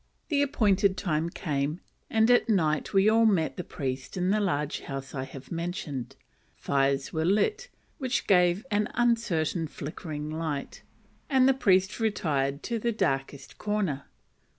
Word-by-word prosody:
The 290 -3 +2
appointed 205 -8 +2
time 165 -3 0
came, 150 -1 -2 0.3
and 225 +1 +4
at 245 0 +4
night 155 -8 +1
we 195 +1 +4
all 225 +1 +5
met 180 -7 +1
the 180 - -4
priest 135 0 -5
in 180 +1 +1
the 215 - +2
large 150 -7 -1
house 135 0 -7
I 130 -2 -3
have 135 -1 -11
mentioned. 165 -7 -4 0.4
Fires 135 0 0
were 160 -1 0
lit, 420 - +1 0.3
which 260 -3 -1
gave 180 +3 +3
an 210 0 +2
uncertain 195 -9 +1
flickering 150 0 -6
light, 155 -3 -4 0.5
and 265 -2 +5
the 270 - +5
priest 190 -6 +2
retired 150 -10 0
to 235 -1 -2
the 235 +2 0
darkest 135 -8 -2
corner. 200 -10 -1
175 Hz, 150 wpm, -28 LUFS, 145-215 Hz, 0.5 s, all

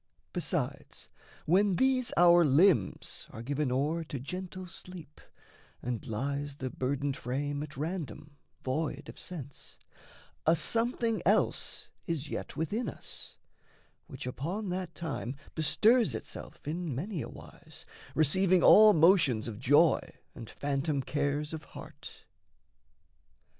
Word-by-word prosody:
Besides, - - -3 0.4
when 190 +3 +3
these 260 +2 +2
our 175 0 +7
limbs 145 - +2
are 115 - -8
given 140 +1 -1
o'er 150 +6 0
To 145 -3 -5
gentle 185 +6 -6
sleep 180 -3 -10 0.6
and 120 -2 -4
lies 140 +5 -3
the 130 -3 -5
burdened 140 +1 -1
frame 145 +4 -3
At 150 -1 -7
random 150 - -5 0.3
void 145 +1 -2
of - - -10
sense, 145 -6 -8 0.7
a 165 - +6
something 230 +5 0
else - - +1 0.2
Is 160 -4 -2
yet - - -5
within 205 +10 -1
us, - - -6 0.7
which 135 -7 -7
upon 175 +11 -3
that 180 -2 -4
time 140 -6 -4 0.2
Bestirs 210 - +3
itself 110 - -8
in 165 -3 -3
many 175 - -3
a - - -6
wise, - - -11 0.3
receiving 180 +4 +4
All 215 0 +9
motions 155 - +4
of 110 -2 -6
joy 145 +6 +5 0.3
and 115 -3 -9
phantom 140 0 -1
cares 145 +2 -1
of 155 -1 -5
heart. - - -11
150 Hz, 120 wpm, -30 LUFS, 140-180 Hz, 0.7 s, All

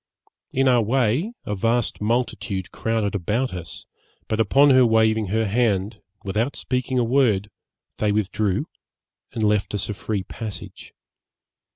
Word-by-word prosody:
In 135 +1 +2
our 125 -2 +5
way, 125 - +1
a 105 - -2
vast 115 +4 0
multitude 105 -4 -1
crowded 110 -3 -1
about 105 +7 -1
us, 85 -2 -8 0.4
but 110 - -1
upon 135 +7 +5
her 130 -1 +6
waving 110 -2 +3
her 110 +4 0
hand, 105 -2 0 0.2
without 110 +8 -1
speaking 130 0 -2
a 125 - +3
word, 115 -5 +2 0.5
they 105 -1 +1
withdrew, 105 -1 0 0.7
and 110 - -2
left 105 -1 +1
us 105 - -3
a - - -1
free 100 0 -3
passage. 110 +2 -8
110 Hz, 140 wpm, -23 LUFS, 105-125 Hz, 0.7 s, her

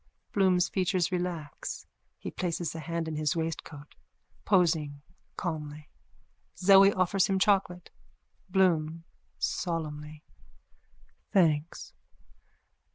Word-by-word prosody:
Bloom's 185 -3 +3
features 185 -1 0
relax. 175 -5 -4 0.3
He - - -7
places 175 -2 -2
a 165 - -6
hand 165 +1 -3
in 155 -1 -3
his 155 +1 0
waistcoat, 160 -3 -5 0.5
posing 160 -7 +2 0.3
calmly. 150 -4 -5 0.7
Zoe 195 +2 +7
offers 185 0 +2
him 195 - +1
chocolate.)_ 190 -3 +1 0.6
BLOOM: 165 -4 +2 0.3
(Solemnly.) 155 -3 -3 1.1
Thanks. 160 -5 +1
170 Hz, 90 wpm, -29 LUFS, 155-185 Hz, 1.1 s, Zoe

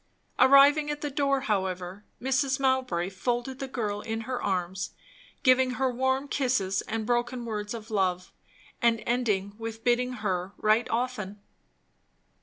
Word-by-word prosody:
Arrived 275 +2 +7
at 295 0 -3
the 295 - -3
door, 275 -1 +1
however, 190 -4 -2 0.2
Mrs. 265 +1 +1
Mowbray 260 -10 +1
folded 245 +6 -2
the 270 - -4
girl 210 -5 -3
in 225 0 -3
her 255 +2 -4
arms, 185 0 -2 0.5
giving 255 -2 +4
her 265 -1 +1
warm 265 +3 0
kisses 225 -10 0
and 225 0 -2
broken 240 +1 -1
words 210 -1 -4
of 225 0 -9
love, 185 -3 0 0.5
and 230 -2 +2
ending 210 -5 0
with 225 0 -6
bidding 250 +1 +2
her 195 -4 -2
write 215 +2 +2
often. 225 -4 -2
235 Hz, 140 wpm, -28 LUFS, 205-260 Hz, 0.5 s, Arrived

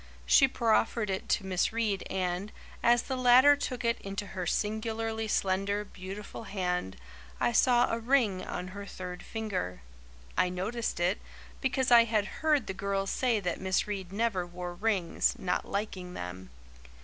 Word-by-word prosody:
She 270 - +6
proffered 225 -3 +1
it 190 - -4
to 195 - +1
Miss 185 -1 +1
Reade 220 -4 0
and, 185 +2 -2 0.3
as 240 0 +4
the 265 - -3
latter 255 +3 +7
took 250 -4 -4
it 235 0 +1
into 195 +1 -4
her 185 -3 -5
singularly 220 +2 -1
slender, 200 +1 0
beautiful 200 +3 -8
hand, 180 - -2 0.4
I - - +2
saw 240 +1 +4
a 230 - -1
ring 225 -6 +2
on 180 0 -5
her 200 +2 -8
third 180 -2 -7
finger. 200 - -4 0.5
I 180 - +3
noticed 200 +4 -3
it, 180 +4 +1 0.4
because 260 -1 +1
I 235 -1 +8
had 215 -2 -1
heard 305 -3 +3
the - - -4
girls 195 0 -1
say 245 -4 +1
that 180 -2 -2
Miss 190 0 +1
Reade 195 -3 -5
never 205 -3 0
wore 175 0 -6
rings, 190 -3 +1
not 180 -1 -1
liking 190 -3 -4
them. 90 +1 -7
200 Hz, 160 wpm, -30 LUFS, 185-230 Hz, 0.5 s, I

